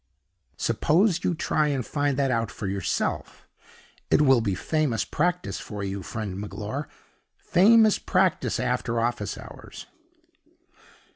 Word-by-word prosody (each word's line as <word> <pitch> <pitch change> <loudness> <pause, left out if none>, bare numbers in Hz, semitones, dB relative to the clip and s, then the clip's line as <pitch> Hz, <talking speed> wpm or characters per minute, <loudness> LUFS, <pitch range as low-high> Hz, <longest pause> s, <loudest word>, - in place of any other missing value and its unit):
Suppose 175 +2 +2
you 180 - +1
try 155 -1 +1
and 135 -5 -1
find 145 -2 -1
that 135 -2 +1
out 115 -2 0
for 105 - -7
yourself. 95 -1 -3 0.6
It - - +4
will 135 -4 +5
be 100 -4 -1
famous 125 - 0
practice 175 +8 -1
for 105 -2 -6
you, 100 0 -4
friend 100 0 -5
Magloire 110 +7 -5 0.5
famous 215 +3 +4
practice 180 - +1
after 125 -2 -1
office 120 +1 -2
hours." - - -11
130 Hz, 125 wpm, -25 LUFS, 110-160 Hz, 0.6 s, will